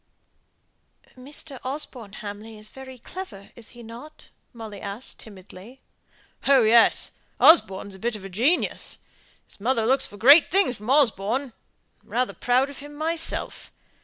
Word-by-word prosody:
"Mr. 270 +1 -6
Osborne 255 -6 -4
Hamley 215 +1 -8
is 215 0 -4
very 260 0 -11
clever, 230 - -9
is 230 -2 -9
he 240 - -11
not?" 240 +7 -12 0.2
Molly 220 -4 -9
asked, 200 +5 -6
timidly. 200 +4 -12 0.7
"Oh, 270 -3 +6
yes. 225 +1 +5 0.3
Osborne's 200 - +5
a 190 - -9
bit 235 +2 -2
of 200 -2 -9
a - - -7
genius. 250 - 0 0.5
His - - -10
mother 230 0 +1
looks 265 +3 +3
for 205 - -13
great 285 +8 +7
things 375 -10 +2
from 210 +3 -9
Osborne. 255 -1 +2 0.5
I'm - - -28
rather 250 +1 0
proud 255 +3 +1
of 280 - -11
him 290 +1 -11
myself. 320 +2 -3
240 Hz, 145 wpm, -24 LUFS, 210-275 Hz, 0.7 s, great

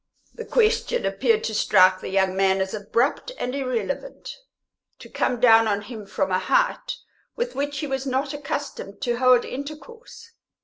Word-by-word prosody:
The 465 - -8
question 470 +1 +1
appeared 450 -1 +1
to 220 - -2
strike 185 -3 +4
the - - -6
young 190 -1 +1
man 190 0 +2
as 190 0 -2
abrupt 230 - -1
and 250 - -3
irrelevant, 270 - -4 0.6
to - - -12
come 245 -2 -1
down 225 -2 +6
on 205 -1 -1
him 220 -4 -9
from 190 -1 -2
a 185 - +2
height - - 0 0.4
with 485 +1 -3
which 285 +1 -3
he 295 - -3
was 270 -1 -3
not 265 +2 -1
accustomed 280 -8 -5
to 240 -1 -1
hold 255 -1 +4
intercourse. 380 - -9
255 Hz, 165 wpm, -23 LUFS, 205-305 Hz, 0.6 s, down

